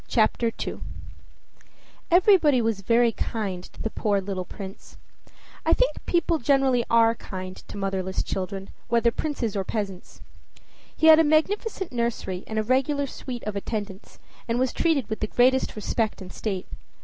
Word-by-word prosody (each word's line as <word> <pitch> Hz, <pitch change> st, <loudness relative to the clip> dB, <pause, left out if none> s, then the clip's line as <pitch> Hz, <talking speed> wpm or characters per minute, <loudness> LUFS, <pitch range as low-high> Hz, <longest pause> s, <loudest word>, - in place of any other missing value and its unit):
CHAPTER 230 Hz, 0 st, +2 dB
II -, -, -5 dB, 1.3 s
Everybody 350 Hz, -, +5 dB
was 225 Hz, -3 st, 0 dB
very 230 Hz, +3 st, +3 dB
kind 200 Hz, -5 st, -3 dB
to -, -, -17 dB
the 225 Hz, -, -2 dB
poor 205 Hz, -2 st, +1 dB
little 190 Hz, -1 st, -4 dB
prince. 195 Hz, +1 st, -10 dB, 0.7 s
I -, -, +3 dB
think -, -, +2 dB
people 340 Hz, -2 st, +2 dB
generally 265 Hz, -2 st, +3 dB
are 230 Hz, 0 st, +5 dB
kind 185 Hz, -4 st, -7 dB
to -, -, -10 dB
motherless 190 Hz, -1 st, -2 dB
children, 195 Hz, +1 st, -4 dB, 0.2 s
whether 235 Hz, 0 st, +3 dB
princes 250 Hz, -7 st, -2 dB
or 195 Hz, -, 0 dB
peasants. 195 Hz, -3 st, -5 dB, 0.8 s
He -, -, +2 dB
had 320 Hz, 0 st, +9 dB
a -, -, +6 dB
magnificent 380 Hz, +6 st, +1 dB
nursery 235 Hz, -6 st, -2 dB
and 220 Hz, -, -4 dB
a 215 Hz, -, +2 dB
regular 270 Hz, +4 st, +1 dB
suite 255 Hz, -2 st, -7 dB
of 210 Hz, -1 st, -4 dB
attendants, 200 Hz, -1 st, -5 dB, 0.3 s
and 230 Hz, 0 st, 0 dB
was 255 Hz, 0 st, +1 dB
treated 315 Hz, -8 st, +1 dB
with 220 Hz, -, -4 dB
the 215 Hz, -, -1 dB
greatest 255 Hz, +4 st, +2 dB
respect 215 Hz, +1 st, -1 dB
and 185 Hz, -2 st, -9 dB
state. 195 Hz, -4 st, -3 dB
230 Hz, 155 wpm, -25 LUFS, 195-270 Hz, 1.3 s, had